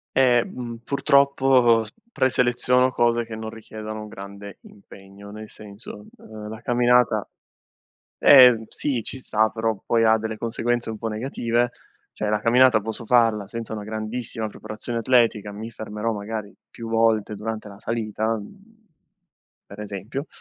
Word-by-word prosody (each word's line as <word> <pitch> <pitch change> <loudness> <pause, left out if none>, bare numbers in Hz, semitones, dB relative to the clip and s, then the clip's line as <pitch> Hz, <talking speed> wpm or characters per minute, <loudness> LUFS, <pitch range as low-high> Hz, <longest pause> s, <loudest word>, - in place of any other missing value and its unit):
Ehm, 120 -2 +1
purtroppo, 135 -4 +3
s 105 - -12 0.2
preseleziono 125 0 +2
cose 120 -1 +1
che 115 - -8
non 110 0 -6
richiedono 110 -1 -8
un 105 - -9
grande 100 -1 -10
impegno, 100 0 -14
nel 110 +1 -9
senso, 105 0 -11
ehm 110 -1 -10
la 110 +1 -8
camminata 120 0 +2 0.9
eh, 125 -5 +8
sì 130 -1 -2
ci 130 - -6
sta, 110 -4 +1
però 110 0 -1
poi 115 -1 +2
ha 110 0 +5
delle 110 0 -4
conseguenze 120 0 -2
un 110 - -8
po' 115 - -3
negative. 120 +1 -1 0.4
Cioè 105 - -3
la 105 0 +1
camminata 120 0 +5
posso 110 +2 -5
farla 115 -4 +3
senza 115 0 -6
una 105 -1 -5
grandissima 110 +1 -4
preparazione 110 +2 -6
atletica, 115 -4 +2
mi 110 +3 -8
fermerò 110 +1 -4
magari 105 0 -6 0.2
più 115 -1 -8
volte 115 -2 +1
durante 110 +1 -5
la 100 -1 -12
salita, 110 0 -2
mhmm, 210 - -14 0.8
per 100 - -12
esempio, 105 - -6
110 Hz, 145 wpm, -23 LUFS, 105-120 Hz, 0.9 s, eh